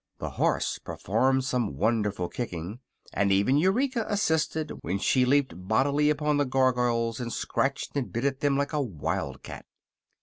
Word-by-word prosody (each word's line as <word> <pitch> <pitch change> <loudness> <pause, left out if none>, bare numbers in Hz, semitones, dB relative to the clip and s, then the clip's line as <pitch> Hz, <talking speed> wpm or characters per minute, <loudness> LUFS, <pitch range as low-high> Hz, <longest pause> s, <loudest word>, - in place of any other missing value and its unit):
The - - -5
horse - - 0
performed 130 +6 0
some 120 - -1
wonderful 105 -2 0
kicking 95 -1 -5 0.3
and 100 0 +1
even 100 +8 +3
Eureka 235 - +1
assisted 160 -6 0
when 90 +4 -2
she 125 +5 +2
leaped 140 +1 +2
bodily 140 +7 +2
upon 150 0 +1
the 145 - +2
Gargoyles 125 -3 +1
and 120 -1 -4
scratched 135 +4 -2
and 140 -3 -2
bit 120 +3 -2
at 135 -1 0
them 140 -1 +1
like 140 +2 -1
a 150 - +1
wild 95 - -3
cat. - - -9
130 Hz, 160 wpm, -27 LUFS, 110-145 Hz, 0.3 s, even